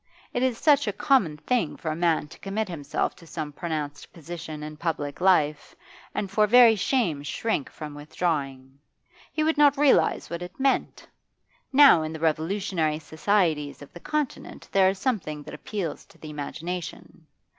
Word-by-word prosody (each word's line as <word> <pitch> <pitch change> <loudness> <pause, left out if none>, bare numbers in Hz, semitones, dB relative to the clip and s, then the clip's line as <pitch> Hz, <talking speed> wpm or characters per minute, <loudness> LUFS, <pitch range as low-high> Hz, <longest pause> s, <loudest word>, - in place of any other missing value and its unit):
It 245 - -1
is 255 -3 +1
such 290 -3 +4
a 205 - 0
common 200 - +2
thing 165 +3 -1
for 160 - -3
a - - -3
man 165 -3 +1
to - - -14
commit 205 +2 -2
himself 160 -6 -2
to 170 - -15
some 155 -2 -5
pronounced 150 -2 -5
position 160 -2 -8
in 150 0 -7
public 150 -2 -3
life 155 -6 +2 0.4
and 200 -2 -2
for 210 +1 +3
very 235 0 +7
shame 200 - 0
shrink 145 +4 -2
from 150 -2 -8
withdrawing. 140 -3 -3 0.5
He 310 - 0
would 315 -1 +1
not 285 -2 +6
realise 285 -1 +3
what 170 0 -5
it 180 +7 -9
meant. 270 0 0 0.6
Now 275 - +7
in 155 0 -4
the 160 - -6
revolutionary 160 0 0
societies 155 -3 0
of 145 - -16
the 175 - -10
Continent 300 - -4
there 190 -1 +5
is 190 - -2
something 190 - -2
that - - -10
appeals 170 +1 -5
to - - -21
the 155 - -9
imagination. 160 +3 -6
170 Hz, 165 wpm, -26 LUFS, 150-210 Hz, 0.6 s, very